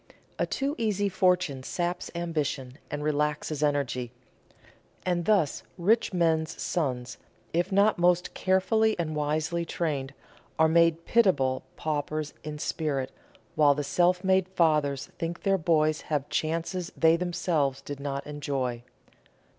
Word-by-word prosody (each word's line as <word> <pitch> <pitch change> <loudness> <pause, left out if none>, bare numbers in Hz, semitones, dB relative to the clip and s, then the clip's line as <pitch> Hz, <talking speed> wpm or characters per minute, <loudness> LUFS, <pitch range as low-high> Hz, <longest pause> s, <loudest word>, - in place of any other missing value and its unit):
A - - +1
too 275 +2 -1
easy 205 -3 +1
fortune 180 -7 +1
saps 175 +6 -3
ambition 150 -6 -3
and 145 0 -4
relaxes 150 0 -1
energy; 140 -5 0 0.9
and 175 -2 0
thus 195 -10 +2 0.2
rich 210 +6 +2
men's 165 -3 +1
sons, 130 -7 -2 0.3
if 175 +3 0
not 200 0 +3
most 180 0 +2
carefully 220 +4 +2
and 160 -3 -2
wisely 155 +3 -1
trained, 145 -5 -3 0.4
are 160 - +5
made 165 0 +3
pitiable 145 - +3
paupers 155 0 -2
in 150 -1 -5
spirit, 145 -3 -2 0.4
while 145 -2 +5
the 145 - -2
self 180 +5 +2
made 190 -1 +3
fathers 150 -6 +1
think 170 0 -4
their 195 -1 +2
boys 155 -2 +2
have 145 -2 0
chances 165 +3 -2
they 160 0 +5
themselves 170 -6 0
did 140 0 -7
not 140 -1 -4
enjoy. 135 -5 -3
160 Hz, 130 wpm, -28 LUFS, 145-180 Hz, 0.9 s, are